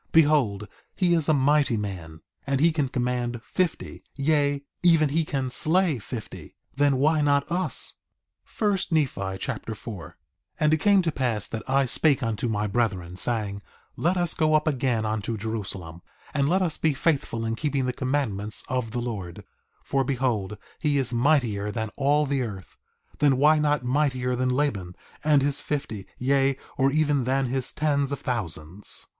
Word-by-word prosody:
Behold, 145 -11 +3 0.3
he 180 -2 +2
is 165 -2 +1
a - - +5
mighty 140 -2 +3
man, 85 -6 -6 0.3
and 140 -1 +1
he 165 +3 +5
can 150 -4 -1
command 125 -1 -1
fifty, 185 +2 -2
yea, 145 0 +1 0.2
even 165 -4 +4
he 160 +4 +1
can 135 -4 -3
slay 165 -1 +3
fifty; 110 +3 -8 0.2
then 140 -1 +3
why 155 +3 +3
not 145 +1 +2
us? 180 +2 -1 0.6
1 205 -3 +2
Nephi 125 - 0
Chapter 115 -1 -4
4 100 -6 -8
4:1 85 - -17 0.5
And 150 0 +3
it - - +4
came 200 +4 +4
to 165 - 0
pass 120 -7 -1
that 110 - -5
I 135 +1 +3
spake 140 +2 +2
unto 115 0 -1
my 105 -1 -1
brethren, 100 -5 -1
saying: 100 -1 -1 0.3
Let 175 +3 +1
us 175 -2 0
go 155 -1 +2
up 155 +1 +2
again 125 -6 0
unto 110 +1 -2
Jerusalem, 100 -6 -5 0.3
and 140 -1 +1
let 190 +2 +2
us 165 -4 -2
be 155 -3 +1
faithful 135 -7 0
in 115 - -1
keeping 140 0 -1
the 125 - -1
commandments 125 -7 -2
of 125 -3 -2
the 120 +2 -3
Lord; 100 -8 -5 0.4
for 135 -1 0
behold 120 -7 -1 0.2
he 150 -3 +1
is 130 -3 0
mightier 120 -6 +2
than 110 -1 -3
all 145 +2 +2
the 140 -1 0
earth, 100 -6 -6 0.4
then 140 -3 +4
why 150 +3 +5
not 150 -4 +1
mightier 130 -2 +1
than 130 +1 0
Laban 125 -10 -1 0.3
and 150 -3 +4
his 145 0 0
fifty, 110 -9 -4
yea, 135 +1 +2 0.2
or 135 0 +2
even 145 -3 +1
than 135 +1 +1
his 130 0 -1
tens 140 -2 0
of 140 - -4
thousands? 95 -5 -2
135 Hz, 170 wpm, -25 LUFS, 110-150 Hz, 0.6 s, a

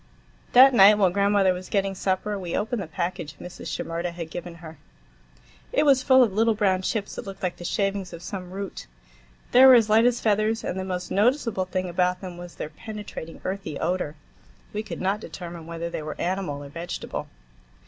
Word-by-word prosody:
That 260 +2 +8
night, 210 -2 +8
while 190 -4 +3
grandmother 200 -1 +3
was 180 0 -8
getting 195 -1 0
supper, 195 +2 -1
we 175 -3 -3
opened 220 +1 -2
the 185 - -6
package 165 -3 -4
Mrs. 180 +4 -9
Shimerda 170 +1 -3
had 170 -2 -7
given 175 -1 -6
her. 160 -1 -12 0.9
It - - +2
was 275 -3 +5
full 260 -1 +6
of 220 -5 0
little 225 +2 +3
brown 190 -3 +2
chips 205 +2 -2
that - - -7
looked 195 0 -9
like 180 -1 -2
the - - -9
shavings 195 0 -1
of 170 0 -9
some 180 -1 -6
root. 195 +1 -6 0.6
They 255 - +7
were 260 -1 +10
as 220 -3 +4
light 225 +2 +6
as 245 -1 +1
feathers, 215 +1 +1
and 190 - -3
the - - -2
most 180 -1 -4
noticeable 230 -2 +1
thing 185 0 -2
about 180 +1 0
them 185 -2 -7
was 175 0 -10
their - - -5
penetrating, 205 -2 -8
earthy 190 -6 -4
odor. 170 -3 -1 0.6
We 210 - -2
could 215 - -7
not 195 +3 0
determine 170 -5 -8
whether 170 0 -4
they 170 - -4
were 155 0 -7
animal 175 -6 -2
or 140 - -9
vegetable. 170 +4 -5
190 Hz, 200 wpm, -25 LUFS, 175-210 Hz, 0.9 s, were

